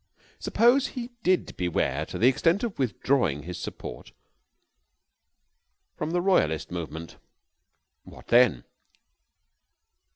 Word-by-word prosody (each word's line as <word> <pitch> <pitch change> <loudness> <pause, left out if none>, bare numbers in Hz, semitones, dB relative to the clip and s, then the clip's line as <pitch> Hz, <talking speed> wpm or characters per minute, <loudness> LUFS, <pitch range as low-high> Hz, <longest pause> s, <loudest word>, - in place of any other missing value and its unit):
Suppose 245 +4 +3
he 245 -1 -7
did 185 -2 +1
beware 90 -2 -1
to - - -6
the 120 - +4
extent 165 - +2
of 225 -9 -4
withdrawing 120 - 0
his 90 +2 -7
support - - -8 1.8
from 155 - -3
the 175 +1 0
royalist 80 - +1
movement, 85 -1 -6 0.9
what - - -15
then? 120 - +5
130 Hz, 100 wpm, -26 LUFS, -, 1.8 s, then